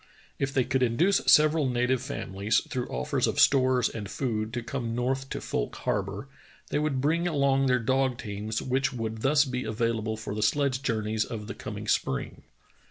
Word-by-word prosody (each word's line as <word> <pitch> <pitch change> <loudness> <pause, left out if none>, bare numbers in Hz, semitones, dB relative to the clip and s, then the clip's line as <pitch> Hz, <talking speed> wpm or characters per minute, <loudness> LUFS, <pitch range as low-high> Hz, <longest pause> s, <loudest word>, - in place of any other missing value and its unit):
If 135 -1 0
they 135 -2 +2
could 130 +2 0
induce 150 +11 +3
several 155 -2 +5
native 125 +1 +1
famihes, 105 -6 -1
through 125 -1 -2
offers 65 +1 -1
of - - -1
stores 130 -3 +4
and 105 -3 -6
food, 110 -4 -2
to 120 -1 -3
come 120 -2 -3
north 130 +2 -1
to - - -4
Fouike - - -3
Harbor, 135 - -3 0.4
they 145 - +1
would 150 -4 0
bring 165 +5 +1
along 140 -4 +2
their 125 -1 +4
dog 130 +1 +1
teams 105 0 -4
which 135 +1 0
would 110 -3 -4
thus 145 +3 +4
be 125 -1 -3
available 110 -1 -1
for 110 -2 -5
the 105 - -3
sledge 130 +4 +1
journeys 110 -3 0
of 110 -3 -6
the - - -6
coming - - -7
spring. - - -1
125 Hz, 180 wpm, -27 LUFS, 110-135 Hz, 0.4 s, several